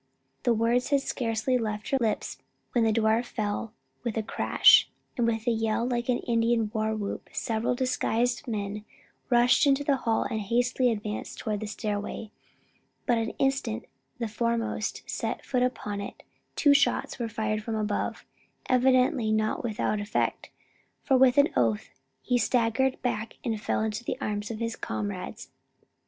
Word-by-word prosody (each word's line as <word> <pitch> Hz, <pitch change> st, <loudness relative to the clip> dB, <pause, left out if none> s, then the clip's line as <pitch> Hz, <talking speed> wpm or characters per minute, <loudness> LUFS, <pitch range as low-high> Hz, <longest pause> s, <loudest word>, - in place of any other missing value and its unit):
The 240 Hz, -, +3 dB
words 235 Hz, +3 st, +1 dB
had 280 Hz, -2 st, +3 dB
scarcely 240 Hz, 0 st, 0 dB
left 215 Hz, -2 st, -3 dB
her 270 Hz, -, +4 dB
lips 220 Hz, -2 st, -1 dB, 0.3 s
when 240 Hz, -, +2 dB
the 225 Hz, -, +3 dB
door 220 Hz, +1 st, +3 dB
fell 215 Hz, -2 st, -3 dB, 0.3 s
with 235 Hz, -2 st, -2 dB
a 220 Hz, -, 0 dB
crash, -, -, +5 dB, 0.3 s
and 240 Hz, -3 st, +1 dB
with 225 Hz, -1 st, -1 dB
a 240 Hz, -, +3 dB
yell 225 Hz, 0 st, 0 dB
like 240 Hz, 0 st, -2 dB
an 245 Hz, -, +3 dB
Indian 230 Hz, -2 st, +1 dB
war 220 Hz, -1 st, 0 dB
whoop 205 Hz, -2 st, -5 dB
several 230 Hz, +2 st, -1 dB
disguised 245 Hz, -1 st, 0 dB
men 210 Hz, -2 st, -3 dB, 0.5 s
rushed 245 Hz, +4 st, +5 dB
into 280 Hz, +1 st, +3 dB
the 280 Hz, -1 st, +2 dB
hall 230 Hz, -3 st, +1 dB
and 220 Hz, -, -2 dB
hastily 245 Hz, +4 st, +2 dB
advanced 210 Hz, -1 st, -4 dB
toward 210 Hz, -1 st, -2 dB
the 215 Hz, -, -4 dB
stairway; 210 Hz, +1 st, -4 dB, 0.7 s
but 235 Hz, -2 st, +2 dB
the 225 Hz, -, -5 dB
instant 270 Hz, -, 0 dB, 0.3 s
the 235 Hz, -, -2 dB
foremost 230 Hz, 0 st, -2 dB
set -, -, -3 dB
foot 255 Hz, -2 st, 0 dB
upon 210 Hz, -5 st, -1 dB
it, 200 Hz, -, -8 dB, 0.3 s
two 290 Hz, -2 st, +5 dB
shots 285 Hz, -, +2 dB
were 235 Hz, -1 st, -2 dB
fired 215 Hz, -1 st, -1 dB
from 220 Hz, +1 st, -3 dB
above, 210 Hz, -1 st, -2 dB, 0.4 s
evidently 255 Hz, -3 st, +3 dB
not 215 Hz, +2 st, 0 dB
without 215 Hz, -2 st, -1 dB
effect; 205 Hz, +1 st, -1 dB, 0.5 s
for 270 Hz, -, +3 dB
with 260 Hz, +1 st, +5 dB
an 285 Hz, +1 st, +6 dB
oath 115 Hz, -4 st, +1 dB, 0.3 s
he 245 Hz, -1 st, +2 dB
staggered 250 Hz, +2 st, +1 dB
back 230 Hz, -3 st, -2 dB
and 225 Hz, -4 st, -2 dB
fell -, -, 0 dB
into 220 Hz, +1 st, -2 dB
the -, -, -3 dB
arms 205 Hz, 0 st, -3 dB
of 225 Hz, -, -4 dB
his 230 Hz, 0 st, -3 dB
comrades. 200 Hz, -3 st, -5 dB
230 Hz, 160 wpm, -28 LUFS, 215-245 Hz, 0.7 s, an